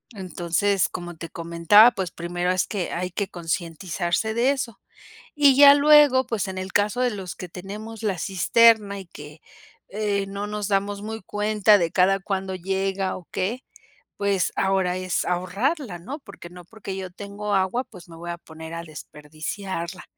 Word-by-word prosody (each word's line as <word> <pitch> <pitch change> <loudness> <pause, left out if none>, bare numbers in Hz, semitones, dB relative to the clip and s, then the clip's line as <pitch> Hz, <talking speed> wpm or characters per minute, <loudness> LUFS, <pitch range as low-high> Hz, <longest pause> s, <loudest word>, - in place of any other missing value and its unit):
Entonces 185 +1 0
como 175 -1 -7
te 165 +1 -8
comentaba 170 +7 +5
pues 190 -6 -3
primero 175 +2 -2
es 185 -1 +1
que 195 -5 -3
hay 180 +1 -3
que 200 +2 -2
concientizarse 175 +3 -2
de 240 +4 +3
eso, 265 -5 -4 0.6
y 285 -2 +5
ya 280 +1 +9
luego 290 -3 +6
pues 215 -3 -2
en 190 0 -6
el 190 +1 -6
caso 210 +4 +1
de 250 - +3
los 190 -4 -6
que 180 - -8
tenemos 210 +5 -8
la 195 -4 0
cisterna 205 +2 +3
y 190 - -9
que, 150 -1 -12 0.5
eh, 205 -1 -1
no 200 +1 -5
nos 210 -1 -3
damos 200 0 -1
muy 220 +1 -6
cuenta 210 +1 +3
de 170 -4 -1
cada 195 +2 +3
cuándo 190 -1 -3
llega 190 +1 -2
o 180 - -14
qué 230 +8 -2 0.5
pues 200 -3 0
ahora 190 -2 +1
es 185 -1 -1
ahorrarla, 195 - -1
¿no? 270 - -7
Porque 200 -8 -12
no 180 0 -12
porque 200 -2 -8
yo 190 -1 -5
tengo 205 +2 -4
agua 190 +6 +1
pues 185 -8 -14
me 165 - -11
voy 175 +1 -8
a 170 - -4
poner 160 0 -11
a 170 - -5
desperdiciarla. 165 +4 -7
195 Hz, 170 wpm, -24 LUFS, 175-210 Hz, 0.6 s, ya